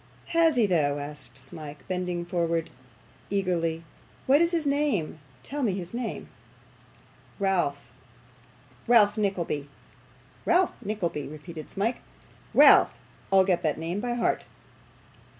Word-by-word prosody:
'Has 330 -2 +4
he 235 -3 +4
though?' 150 -7 +1
asked 145 -4 -7
Smike, 145 +3 -8
bending 180 -1 -2
eagerly - - -7
forward. 165 - -3 0.4
'What 280 +4 +5
is 340 - +4
his 335 -3 0
name? 280 - 0 0.2
Tell 290 - -5
me 220 -7 +1
his 180 0 -6
name.' 240 -1 -4 1.1
'Ralph 175 - -1 1.0
Ralph 210 -4 +5
Nickleby.' 175 -9 -2 0.7
'Ralph 355 +1 +3
Nickleby,' 175 -9 -3
repeated 155 +2 -9
Smike. 220 +5 -1 0.6
'Ralph. - - +7 0.3
I'll 190 -1 +6
get 180 -2 +1
that 155 -3 0
name 170 +4 -3
by 240 +2 -2
heart. 240 - 0
180 Hz, 115 wpm, -27 LUFS, 155-225 Hz, 1.1 s, Ralph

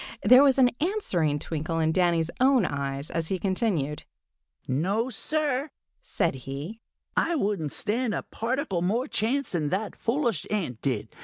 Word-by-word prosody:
There 250 +6 +8
was 275 -2 +5
an 250 -2 +5
answering 195 - +1
twinkle 160 +2 -3
in 160 -1 +2
Danny's 170 -2 +2
own 260 -4 +4
eyes 140 -1 -3
as 165 -1 -2
he 190 - -1
continued. 185 - -1 0.6
"No, 195 - 0
Sir," 295 +3 -1 0.3
said - - 0 0.2
he, 155 +12 -6 0.3
"I 340 - +2
wouldn't 195 - -1
stand 225 +1 -1
a - - -3
particle 235 - -2
more 220 +8 +1
chance 270 +3 0
than 155 -5 -1
that 200 +4 -2
foolish 235 - -1
ant 165 - -2
did. 115 -6 -1
195 Hz, 150 wpm, -27 LUFS, 160-250 Hz, 0.6 s, There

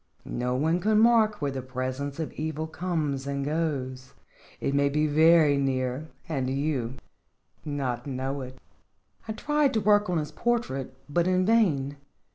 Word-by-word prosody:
No 125 +1 -2
one 160 +6 +1
can 215 +3 +2
mark 220 -5 +4
where 140 - 0
the 135 -1 -4
presence 130 +2 -4
of 160 - -3
evil 155 0 -3
comes 155 -5 -2
and 140 0 -2
goes. 135 -5 -3 0.4
It 140 - -1
may 140 0 +3
be 150 +2 +1
very 155 -1 +5
near, 130 +1 -1 0.2
and 135 -6 -1
you 135 -3 -1 0.7
not 140 -3 -3
know 135 +1 -3
it." 130 0 -8 0.7
I 220 - -2
tried 295 +2 +1
to - - +3
work 205 -1 +3
on 175 - +1
his 150 -1 -3
portrait, 135 - -2
but 170 +4 +1
in 185 0 +2
vain. 155 -11 +2
145 Hz, 155 wpm, -27 LUFS, 135-175 Hz, 0.7 s, very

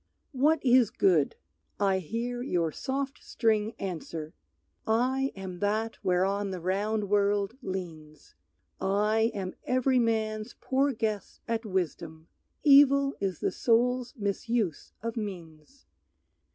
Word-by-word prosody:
What 290 +2 +2
is 245 -3 +5
good? 170 -10 +2 0.4
I 195 -2 +2
hear 235 +7 -3
your 175 - 0
soft 275 - -4
string 220 -1 0
answer, 165 -4 -5 0.5
"I 255 +4 +1
am 190 -2 -7
that 215 +3 -1
whereon 195 +2 +1
the 185 -1 -4
round 205 +4 -1
world 205 +1 +1
leans, 165 -7 -7 0.5
I 210 +3 +2
am 185 -2 -4
every 255 0 +2
man's 220 -1 -1
poor 275 +2 +1
guess 215 -4 -3
at 230 -1 -2
wisdom; 165 -4 -3 0.3
Evil 280 -1 +6
is 190 -4 -2
the - - +1
soul's 245 +2 +1
misuse 205 -3 -2
of 230 0 -3
means. 185 - -8
215 Hz, 115 wpm, -29 LUFS, 190-245 Hz, 0.5 s, Evil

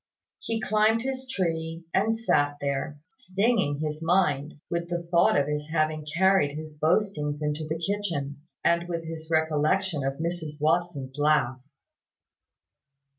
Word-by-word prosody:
He 225 -1 -2
climbed 220 +1 +2
his 260 0 -4
tree, 165 -6 -2
and 220 +4 +2
sat 145 -10 +1
there, 140 +1 -2 0.2
stinging 195 - +1
his 155 0 -3
mind 160 -4 +1
with 170 0 -3
the 175 0 -2
thought 170 -3 +4
of 140 - +1
his 150 0 -3
having 155 -1 0
carried 190 -6 +4
his 155 0 -7
boastings 150 -2 0
into 150 +1 -2
the 160 +1 -2
kitchen, 165 -6 -2 0.2
and 170 0 +2
with 170 -1 -2
his 160 0 -7
recollection 160 +1 +1
of 135 0 0
Mrs 160 -2 -3
Watson's 150 -4 0
laugh. 145 -4 +2
160 Hz, 135 wpm, -27 LUFS, 150-185 Hz, 0.2 s, thought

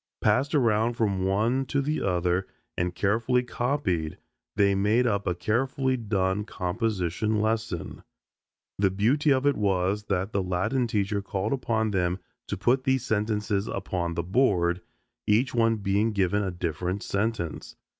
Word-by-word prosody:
Passed 140 +4 +2
around 115 -3 +2
from 100 -4 0
one 110 +7 +1
to 140 - 0
the 150 +3 -1
other 90 0 0 0.3
and 90 0 -1
carefully 115 +6 +1
copied 120 - -1 0.4
they 100 -1 +4
made 105 +5 +2
up 100 -4 0
a 90 - +1
carefully 130 +7 0
done 100 -4 0
composition 105 +1 -1
lesson. 110 -5 -2 0.8
The 100 -1 +4
beauty 120 +11 +2
of 135 0 +2
it 145 -1 +4
was 100 0 0
that 95 0 -1
the 100 - 0
Latin 95 +8 0
teacher 100 -2 0
called 100 +2 -2
upon 110 -4 0
them 90 -2 0 0.3
to - - -3
put 130 +2 +2
these 130 -1 +1
sentences 105 -2 0
upon 90 -3 -3
the 85 - -1
board, 90 -4 +2 0.5
each 115 +5 +3
one 115 -1 +3
being 105 +2 0
given 100 0 +1
a 95 - -1
different 90 +2 -3
sentence. 100 -5 -2
105 Hz, 145 wpm, -27 LUFS, 95-115 Hz, 0.8 s, they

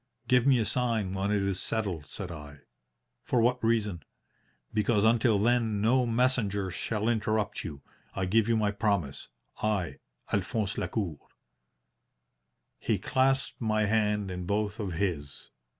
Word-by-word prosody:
"'Give 125 0 +4
me 135 -2 +6
a 115 - +1
sign 115 -6 0
when 95 +1 -1
it 105 -1 +2
is 100 -1 -1
settled,' 95 -9 -2
said 95 -4 -5
I. 75 -3 -10 0.6
"'For 125 - +1
what 125 +2 +2
reason?' 105 -6 +1 0.7
"'Because 105 0 +2
until 110 -1 +4
then 115 0 +2
no 120 +4 +3
messenger 115 -5 +1
shall 105 +4 -2
interrupt 110 -2 0
you. 70 -3 -7 0.3
I 95 - 0
give 110 +4 +2
you 115 - +3
my 105 -2 +2
promise 100 - -1 0.3
I, 105 -5 -1 0.3
Alphonse 105 -3 -1
Lacour.' 90 -10 -2 1.6
"He - - 0
clasped 135 +1 +1
my 110 -1 +2
hand 105 -2 +1
in 90 -1 -5
both 105 +1 -1
of 100 -4 -3
his. 80 -6 -3
105 Hz, 140 wpm, -29 LUFS, 95-115 Hz, 1.6 s, me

